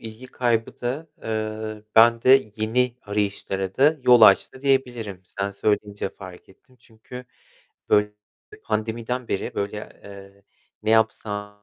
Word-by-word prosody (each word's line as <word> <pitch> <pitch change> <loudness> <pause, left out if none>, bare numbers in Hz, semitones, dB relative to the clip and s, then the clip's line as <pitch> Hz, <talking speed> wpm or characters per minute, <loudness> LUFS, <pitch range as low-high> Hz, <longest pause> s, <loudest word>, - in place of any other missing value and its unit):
ilgi 110 +3 -10
kaybı 120 -3 -1
da, 130 +6 -3 0.2
eee, 110 -1 -4
bende 115 +2 +5
yeni 120 +3 0
arayışlara 100 -2 -3
da 150 +4 +4
yol 125 -1 +6
açtı 110 +5 +5
diyebilirim. 120 -8 -1
Sen 100 +2 -4
söyleyince 105 0 -2
fark 95 -2 -13
ettim, 130 +7 -23
çünkü, 120 +2 -12 0.6
böyle, 105 0 +3 0.5
pandemiden 115 +3 -3
beri, 95 - -3
böyle, 100 +1 -3 0.3
eee, 100 0 -13 0.4
ne 110 - -1
yapsam, 105 -2 0
110 Hz, 120 wpm, -23 LUFS, 105-125 Hz, 0.6 s, yol